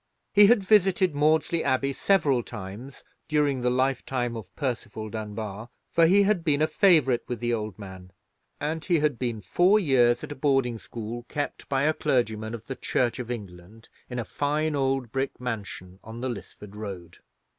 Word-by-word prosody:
He 205 0 +8
had 225 -2 +4
visited 190 -3 +3
Maudesley 155 +3 +2
Abbey 135 0 +1
several 145 -8 +2
times 110 +6 -9 0.2
during 145 -4 +1
the 125 - +2
lifetime 125 -1 0
of 110 -5 -8
Percival 115 -5 -4
Dunbar, 110 0 -6 0.2
for 165 -1 +5
he 200 +4 +5
had 200 -4 +1
been 150 -4 +2
a 155 - +4
favourite 155 - +4
with 120 -2 -4
the 120 +1 -1
old 110 -4 -3
man; 95 -3 -10 0.5
and 155 +2 -3
he 175 +1 +2
had 150 -5 0
been 120 -4 -2
four 185 - +3
years 125 -8 +3
at - - -7
a - - -5
boarding 135 -4 +1
school 115 +2 -6
kept 145 -1 -4
by 135 0 +1
a 155 +1 +3
clergyman 115 -7 -1
of 115 -1 -11
the 135 - -5
Church 125 -1 -1
of 125 -2 -5
England 105 -1 -8 0.2
in 125 - -5
a 120 - -2
fine 150 +4 -1
old 135 -3 0
brick 135 +2 -2
mansion 100 -6 -6
on 110 +1 -9
the 130 +1 -2
Lisford 105 -3 -9
Road. 100 -5 -8
125 Hz, 175 wpm, -26 LUFS, 110-150 Hz, 0.5 s, He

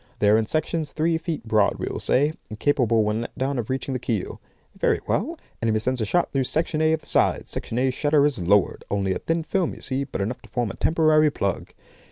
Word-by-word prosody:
They 105 - +3
are 110 - +6
in 110 - -2
sections, 155 0 -1
three 160 +1 +1
feet 160 -9 -5
broad, 105 -2 +3
we - - -3
will - - -4
say, 145 +4 +2 0.2
and 110 -1 -8
capable 120 -6 +2
when 105 +2 0
let 120 - -7
down 135 0 -1
of 115 - -4
reaching 130 +1 -2
the 130 - -2
keel. 110 -5 -3 0.3
Very - - +1
well! - - -1 0.2
Enemy 110 -1 +1
sends 125 +3 -1
a - - +1
shot 175 +11 0
through 135 -2 +1
Section 155 +2 0
A 155 0 +4
of 160 - -1
the - - -20
side. - - +1
Section 115 - -4
A 130 +1 +2
shutter 145 +2 +2
is 145 -7 0
lowered. 95 +3 +2
Only 100 -1 0
a - - -3
thin 165 0 -1
film, 185 +1 -1
you - - -13
see, 130 +1 -1
but - - -6
enough 110 +6 -3
to - - -17
form 120 -5 -1
a - - -10
temporary 155 -1 +3
plug. 100 -9 -3
130 Hz, 245 wpm, -24 LUFS, 110-155 Hz, 0.3 s, are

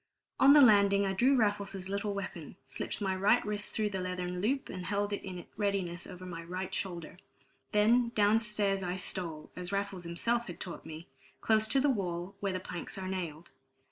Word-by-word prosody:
On 275 +1 +8
the 295 -1 +9
landing 200 -3 +6
I 195 - 0
drew 255 +8 +4
Raffles's 200 -4 0
little 200 +1 -2
weapon, 180 -4 -6
slipped - - -4
my 190 -2 0
right 195 +2 +3
wrist 210 0 -2
through 210 -2 0
the 190 -1 -2
leathern 180 0 -3
loop, 265 +6 0
and 180 -1 -6
held 205 0 0
it - - -2
in 180 -2 -7
readiness 195 -4 -1
over 185 -1 -9
my 170 -2 -6
right 185 +2 -5
shoulder. 175 -4 -4 0.5
Then, 230 +3 +4
down 210 +1 +5
stairs 210 -3 0
I 180 -1 -2
stole, 170 -4 -4
as 180 0 -4
Raffles 200 -2 -2
himself 230 +8 -1
had 175 - -8
taught 175 -3 -7
me, 160 +2 -8 0.3
close 220 -1 +3
to 270 - +4
the 280 +1 +3
wall, 180 -4 -3
where 200 -1 -1
the 185 - -2
planks 180 +1 -6
are 190 -1 -4
nailed. 170 -4 -5
195 Hz, 195 wpm, -31 LUFS, 180-210 Hz, 0.5 s, the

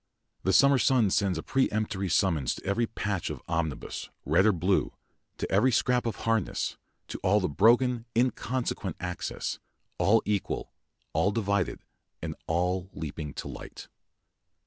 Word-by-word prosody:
The 95 - +1
summer 140 +6 +6
sun 120 -8 +3
sends 95 -4 +1
a 80 - -4
peremptory 110 -7 0
summons 80 -8 +2
to - - -11
every 115 +4 +1
patch 100 -5 -2
of - - -6
omnibus, 80 -4 -3 0.2
red 85 +8 +4
or - - +6
blue, 90 +1 +1 0.4
to - - -4
every 110 +7 +4
scrap 125 0 +2
of 115 - -2
harness, 115 -1 0 0.3
to - - -5
all 100 +3 +3
the 95 - 0
broken, 120 - +3
inconsequent 120 -6 -1
accents, 90 -1 -4 0.4
all 115 +3 +4
equal, 105 -2 -2 0.4
all 100 - +3
divided, 100 -4 0 0.4
and - - -4
all 90 +2 0
leaping 75 -1 -5
to - - -5
light. - - -9
100 Hz, 145 wpm, -28 LUFS, 90-115 Hz, 0.4 s, summer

